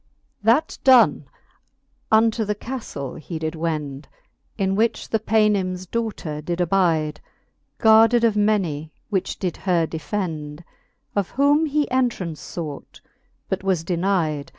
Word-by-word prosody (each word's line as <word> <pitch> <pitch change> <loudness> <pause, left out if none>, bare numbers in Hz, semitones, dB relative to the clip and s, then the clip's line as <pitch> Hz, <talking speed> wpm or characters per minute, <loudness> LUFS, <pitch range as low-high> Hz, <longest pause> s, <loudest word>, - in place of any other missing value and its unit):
XX. 205 - -20
That 235 +8 +3
done, 255 -3 +5 0.9
unto 220 +1 +4
the 210 0 -2
caftle 210 - -6
he 165 +2 -6
did 160 0 -3
wend, 155 -4 -4 0.5
In 195 -2 0
which 225 +3 0
the 220 - +1
Paynims 200 -4 +1
daughter 190 -8 -4
did 170 +3 -3
abide. 165 -4 +1 0.6
Guarded 225 +2 +5
of 225 -2 +3
many, 185 -8 0 0.2
which 190 -3 -1
did 180 -3 -3
her 175 -4 +1
defend; 160 -2 -4 0.5
Of 200 -3 0
whom 290 +4 +3
he 295 0 +1
entraunce 230 -11 -1 0.2
fought, 155 -5 -7 0.5
but 190 0 -3
was 185 -4 0
denide. 170 -5 -1
190 Hz, 130 wpm, -22 LUFS, 160-220 Hz, 0.9 s, done